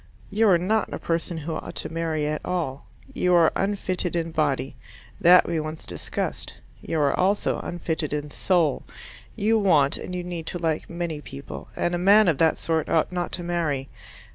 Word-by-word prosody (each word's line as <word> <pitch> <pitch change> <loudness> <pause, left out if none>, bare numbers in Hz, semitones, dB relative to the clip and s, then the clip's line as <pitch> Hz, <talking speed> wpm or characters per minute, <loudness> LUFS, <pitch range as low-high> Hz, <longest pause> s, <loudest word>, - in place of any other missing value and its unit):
You 215 +1 +3
are 180 - +6
not 210 +6 0
a - - -3
person 165 0 -2
who 160 +1 -4
ought - - -6
to - - -5
marry 160 -2 -1
at 150 +1 -2
all. 155 -7 -3 0.3
You 180 -7 +2
are 165 -2 +5
unfitted 190 -3 -1
in 165 -1 -1
body: 145 -4 0 0.4
that 180 +1 +7
we 170 -1 0
once 155 +1 -6
discussed. - - -4 0.3
You 160 - -2
are 140 -1 +3
also 200 +2 +1
unfitted 165 -3 -3
in 150 0 -3
soul: 170 -6 +1 0.5
you 220 +2 +2
want 155 -9 +3
and 180 - -6
you 180 - -3
need 175 -2 -6
to - - -3
like 160 -2 -2
many 170 -3 -4
people, 70 - -9
and 175 - 0
a 175 - 0
man 200 +3 +6
of 160 -6 +2
that 160 -1 +3
sort 160 -2 -1
ought 160 +1 +2
not 180 -1 -2
to 175 - -4
marry. 160 -6 -1
170 Hz, 190 wpm, -25 LUFS, 155-180 Hz, 0.5 s, that